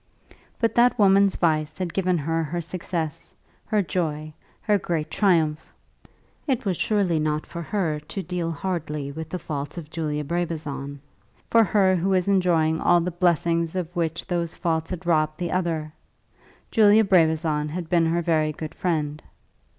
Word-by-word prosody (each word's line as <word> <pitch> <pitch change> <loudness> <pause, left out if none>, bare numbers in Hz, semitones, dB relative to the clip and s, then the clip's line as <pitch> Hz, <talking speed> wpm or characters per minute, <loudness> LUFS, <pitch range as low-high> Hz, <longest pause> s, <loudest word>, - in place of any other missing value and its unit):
But 230 -1 +1
that 245 +1 +4
woman's 200 -2 +5
vice 155 -2 0
had 180 -3 -3
given 185 -2 +1
her 165 +2 -1
her 170 +3 -3
success, 170 -2 -4 0.3
her 210 -2 +2
joy, 155 -4 -3 0.3
her 210 -2 +2
great 160 -3 -3
triumph! 160 -6 +1 0.8
It 260 -3 0
was 190 -3 +1
surely 190 -4 +1
not 155 0 -1
for 170 - -7
her 165 -4 -1
to 165 +6 -6
deal 180 -2 -3
hardly 150 -4 -3
with 160 +2 -7
the 180 - -3
faults 145 -2 -5
of 160 -2 -8
Julia 150 -2 -2
Brabazon, 150 -4 -3 0.5
for 230 -1 +6
her 195 -3 +3
who 180 +3 0
was 185 -1 +2
enjoying 170 -5 +2
all 175 - +4
the 180 +2 -2
blessings 170 -1 +1
of 180 -1 -4
which 165 -1 -2
those 170 -2 -2
faults 160 -2 -1
had 185 -1 -6
robbed 155 -2 +1
the 175 -2 -3
other! 165 -4 -1 0.8
Julia 215 0 +6
Brabazon 160 -5 +2
had 170 +2 -5
been 165 -1 +3
her 170 +1 0
very 155 -2 +1
good 155 0 -7
friend. 155 -4 -2
170 Hz, 160 wpm, -24 LUFS, 155-185 Hz, 0.8 s, for